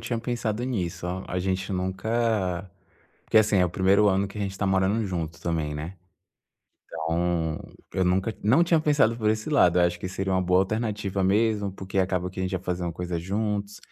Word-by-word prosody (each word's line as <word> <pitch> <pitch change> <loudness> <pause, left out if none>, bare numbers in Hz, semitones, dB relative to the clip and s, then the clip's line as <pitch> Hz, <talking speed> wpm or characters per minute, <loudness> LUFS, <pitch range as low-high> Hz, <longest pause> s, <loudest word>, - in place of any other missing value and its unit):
tinha 120 -2 -2
pensado 120 -1 -2
nisso. 90 -8 -3 0.2
A 90 - -2
gente 95 +1 -2
nunca 95 -1 -1 0.5
porque 110 - +4
assim, 105 -2 +3
é 90 - +5
o - - -6
1º 95 +3 +4
ano 95 0 +2
que 105 - -12
a - - -3
gente 95 -1 -3
tá 100 - 0
morando 95 +3 +2
junto 80 -3 -4
também, 80 -3 -1
né. 80 +5 -6 0.9
Então, 80 0 -1 0.4
eu 95 - +1
nunca 95 +5 +1
não 125 +12 +4
tinha 165 -2 +3
pensado 145 -7 +3
por 110 -2 0
esse 110 +6 -2
lado. 90 - +4
Acho 85 0 +2
que 90 - -4
seria 95 +1 -2
uma 95 - +2
boa 90 +1 +3
alternativa 105 -2 -1
mesmo, 105 0 +2
porque 95 0 -4
acaba 90 -1 0
que 95 - -7
a - - 0
gente 95 - -2
ia 95 - 0
fazendo 90 -1 -2
coisa 90 0 -3
juntos, 105 +2 -2
95 Hz, 195 wpm, -26 LUFS, 90-110 Hz, 0.9 s, é